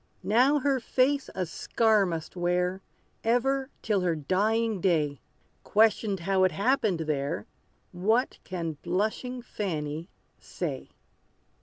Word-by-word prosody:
Now 255 Hz, +7 st, +4 dB
her 275 Hz, -1 st, +1 dB
face 265 Hz, +3 st, +1 dB
a 185 Hz, -, -1 dB
scar 215 Hz, +4 st, +2 dB
must 165 Hz, -1 st, -5 dB
wear, 180 Hz, +1 st, 0 dB, 0.4 s
Ever 265 Hz, +4 st, +1 dB
till 210 Hz, -4 st, +1 dB
her 175 Hz, -2 st, +1 dB
dying 210 Hz, +6 st, 0 dB
day! 150 Hz, -7 st, +1 dB, 0.4 s
Questioned 210 Hz, -3 st, +2 dB
how 190 Hz, +1 st, +2 dB
it 185 Hz, -, +4 dB
happened 215 Hz, -5 st, +1 dB
there, 140 Hz, -8 st, -2 dB, 0.5 s
What 220 Hz, +8 st, +1 dB
can 165 Hz, -4 st, -4 dB
blushing 225 Hz, +6 st, -2 dB
Fanny 160 Hz, -6 st, -4 dB, 0.3 s
say? -, -, -5 dB
195 Hz, 115 wpm, -28 LUFS, 175-230 Hz, 0.5 s, Now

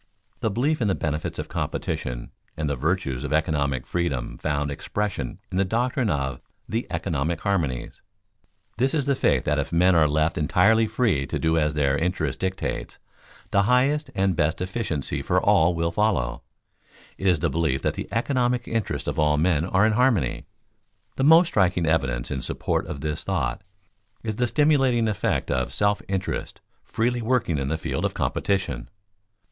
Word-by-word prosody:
The 110 Hz, -, 0 dB
belief 135 Hz, +8 st, 0 dB
in 110 Hz, -, +2 dB
the 95 Hz, -, +2 dB
benefits 75 Hz, 0 st, -3 dB
of -, -, -4 dB
competition -, -, -3 dB, 0.3 s
and 75 Hz, -1 st, -1 dB
the 70 Hz, -, 0 dB
virtues 75 Hz, -2 st, -1 dB
of 75 Hz, -, -4 dB
economic 75 Hz, -4 st, 0 dB
freedom 70 Hz, -9 st, -2 dB
found 75 Hz, -1 st, -1 dB
expression 90 Hz, -3 st, -3 dB
in 90 Hz, -, -1 dB
the -, -, +4 dB
doctrine 120 Hz, +4 st, 0 dB
of 65 Hz, -5 st, -2 dB, 0.3 s
"the 115 Hz, +3 st, -2 dB
economic 80 Hz, -1 st, -2 dB
harmonies." 80 Hz, -11 st, -2 dB, 0.8 s
This 130 Hz, +6 st, +1 dB
is 145 Hz, -4 st, +1 dB
the 140 Hz, -, +2 dB
faith 130 Hz, -, +2 dB
that 75 Hz, 0 st, +1 dB
if 70 Hz, -, -3 dB
men 90 Hz, +2 st, +4 dB
are 80 Hz, -3 st, +5 dB
left 75 Hz, +2 st, +1 dB
entirely 100 Hz, +8 st, +4 dB
free 110 Hz, -, +1 dB
to -, -, -2 dB
do 80 Hz, 0 st, +1 dB
as 75 Hz, -1 st, +1 dB
their 70 Hz, -2 st, +2 dB
interest 80 Hz, -2 st, -1 dB
dictates, 95 Hz, 0 st, -3 dB, 0.5 s
the 100 Hz, -, +4 dB
highest 135 Hz, +7 st, +2 dB
and 95 Hz, -1 st, +1 dB
best 80 Hz, +2 st, +1 dB
efficiency 90 Hz, -, -3 dB
for -, -, +2 dB
all 85 Hz, +2 st, +3 dB
will 85 Hz, 0 st, 0 dB
follow; 100 Hz, -, 0 dB, 0.8 s
it 95 Hz, -, -1 dB
is 90 Hz, -3 st, +4 dB
the 85 Hz, +2 st, 0 dB
belief 75 Hz, -4 st, 0 dB
that -, -, +1 dB
the -, -, -6 dB
economic 125 Hz, 0 st, 0 dB
interests 105 Hz, -10 st, -2 dB
of -, -, -2 dB
all 75 Hz, -1 st, +3 dB
men 80 Hz, 0 st, +2 dB
are 95 Hz, +3 st, +3 dB
in 110 Hz, -, +3 dB
harmony. 110 Hz, -, +1 dB, 0.7 s
The 135 Hz, -, -1 dB
most 165 Hz, +3 st, +7 dB
striking 90 Hz, -3 st, +2 dB
evidence 65 Hz, -7 st, 0 dB
in 65 Hz, -, -2 dB
support -, -, -2 dB
of 70 Hz, -, -6 dB
this 75 Hz, 0 st, -3 dB
thought -, -, -1 dB, 0.6 s
is 110 Hz, -2 st, -3 dB
the 125 Hz, -, +1 dB
stimulating 135 Hz, -3 st, +3 dB
effect 105 Hz, -3 st, -1 dB
of 65 Hz, 0 st, 0 dB
self 100 Hz, 0 st, +1 dB
interest 95 Hz, -1 st, -3 dB, 0.2 s
freely 120 Hz, +2 st, -1 dB
working 115 Hz, -, +1 dB
in 70 Hz, -, -2 dB
the 80 Hz, +3 st, -1 dB
field -, -, -3 dB
of -, -, -1 dB
competition. 95 Hz, -11 st, -1 dB
90 Hz, 175 wpm, -24 LUFS, 75-110 Hz, 0.8 s, most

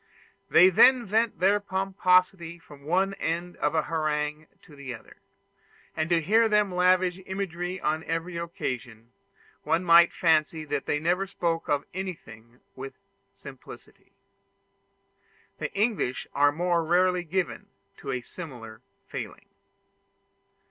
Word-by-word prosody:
They 185 Hz, +2 st, +7 dB
then 250 Hz, +6 st, +6 dB
vent 220 Hz, +3 st, 0 dB
their 200 Hz, +3 st, +3 dB
pomposity 185 Hz, -3 st, +1 dB
from 145 Hz, -4 st, -16 dB
one 190 Hz, +5 st, +1 dB
end 170 Hz, +2 st, -3 dB
of -, -, -1 dB
a 160 Hz, -, +2 dB
harangue 155 Hz, -1 st, -2 dB, 0.2 s
to 150 Hz, -, -16 dB
the 135 Hz, -3 st, -7 dB
other; 110 Hz, -, -16 dB, 0.8 s
and 155 Hz, +1 st, -2 dB
to 170 Hz, -1 st, +3 dB
hear 220 Hz, +7 st, +3 dB
them 210 Hz, -3 st, +2 dB
lavish 180 Hz, 0 st, +2 dB
imagery 185 Hz, -1 st, -4 dB
on 155 Hz, 0 st, -1 dB
every 165 Hz, +2 st, -3 dB
occasion, 125 Hz, -9 st, -5 dB, 0.5 s
one 170 Hz, -, 0 dB
might 170 Hz, 0 st, +6 dB
fancy 160 Hz, -1 st, +1 dB
that 145 Hz, -1 st, -3 dB
they 150 Hz, -, 0 dB
never 175 Hz, +5 st, 0 dB
spoke 170 Hz, -3 st, -2 dB
of 145 Hz, -1 st, 0 dB
anything 125 Hz, -11 st, -8 dB
with 135 Hz, +1 st, -8 dB, 0.4 s
simplicity. -, -, -14 dB, 1.5 s
The -, -, -4 dB
English 200 Hz, -, 0 dB
are 145 Hz, 0 st, +4 dB
more 170 Hz, +2 st, 0 dB
rarely 180 Hz, +2 st, +2 dB
given 180 Hz, +2 st, -3 dB, 0.3 s
to -, -, -9 dB
a 125 Hz, -, -2 dB
similar 120 Hz, -6 st, -10 dB, 0.3 s
failing. -, -, -7 dB
170 Hz, 125 wpm, -26 LUFS, 150-185 Hz, 1.5 s, They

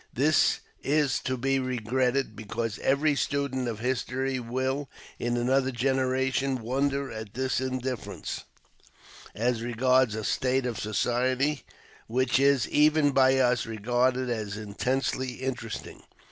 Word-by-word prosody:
This 145 Hz, +4 st, +3 dB, 0.2 s
is 145 Hz, -2 st, +2 dB
to 130 Hz, 0 st, -1 dB
be 135 Hz, +2 st, +1 dB
regretted, 130 Hz, 0 st, 0 dB
because 110 Hz, +1 st, -4 dB
every 145 Hz, +3 st, +2 dB
student 140 Hz, -3 st, -1 dB
of 110 Hz, -2 st, -4 dB
History 130 Hz, +1 st, -1 dB
will, 130 Hz, +4 st, -2 dB, 0.3 s
in 120 Hz, 0 st, -1 dB
another 130 Hz, +2 st, +2 dB
generation, 130 Hz, +1 st, 0 dB
wonder 140 Hz, +3 st, 0 dB
at 110 Hz, -2 st, -8 dB
this 130 Hz, 0 st, 0 dB
indifference 130 Hz, -2 st, -4 dB, 0.9 s
as 120 Hz, +1 st, 0 dB
regards 125 Hz, 0 st, +2 dB
a 110 Hz, -, -4 dB
state 130 Hz, +4 st, +1 dB
of 120 Hz, -4 st, -3 dB
society 125 Hz, +6 st, 0 dB, 0.5 s
which 130 Hz, +3 st, +2 dB
is, 140 Hz, -4 st, +3 dB
even 150 Hz, -1 st, +4 dB
by 135 Hz, 0 st, +4 dB
us, 125 Hz, -2 st, +2 dB
regarded 125 Hz, +4 st, +1 dB
as 110 Hz, -4 st, -3 dB
intensely 125 Hz, +4 st, -2 dB
interesting. 125 Hz, -4 st, -5 dB
130 Hz, 120 wpm, -27 LUFS, 120-135 Hz, 0.9 s, even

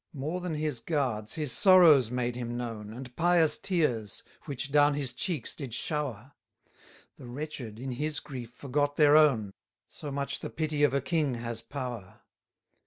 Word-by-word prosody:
240 145 Hz, +1 st, -4 dB
More 180 Hz, +1 st, -3 dB
than 175 Hz, -3 st, -3 dB
his 150 Hz, -5 st, -2 dB
guards, 120 Hz, -7 st, -2 dB
his 150 Hz, -5 st, -1 dB
sorrows 170 Hz, -, +6 dB
made 125 Hz, 0 st, -2 dB
him 120 Hz, -1 st, -4 dB
known, 115 Hz, -3 st, -5 dB
And 125 Hz, +2 st, -9 dB
pious 170 Hz, -3 st, +3 dB
tears, 125 Hz, -, 0 dB, 0.2 s
which 140 Hz, -1 st, -4 dB
down 145 Hz, 0 st, +4 dB
his 135 Hz, -4 st, -2 dB
cheeks 150 Hz, -, -1 dB
did 130 Hz, -6 st, -6 dB
shower; 135 Hz, -5 st, -3 dB, 0.9 s
The -, -, -11 dB
wretched 125 Hz, -4 st, -6 dB
in 130 Hz, +2 st, -5 dB
his 150 Hz, +4 st, -2 dB
grief 125 Hz, -5 st, -8 dB
forgot 145 Hz, +3 st, -1 dB
their 150 Hz, -1 st, +6 dB
own; 125 Hz, -11 st, +4 dB, 0.3 s
So 150 Hz, -, -7 dB
much 140 Hz, 0 st, -3 dB
the -, -, -5 dB
pity 155 Hz, -2 st, -2 dB
of 145 Hz, -2 st, +4 dB
a 140 Hz, -, +1 dB
king 140 Hz, -1 st, 0 dB
has 115 Hz, -1 st, -5 dB
power. 120 Hz, -5 st, -7 dB
140 Hz, 170 wpm, -29 LUFS, 120-150 Hz, 0.9 s, sorrows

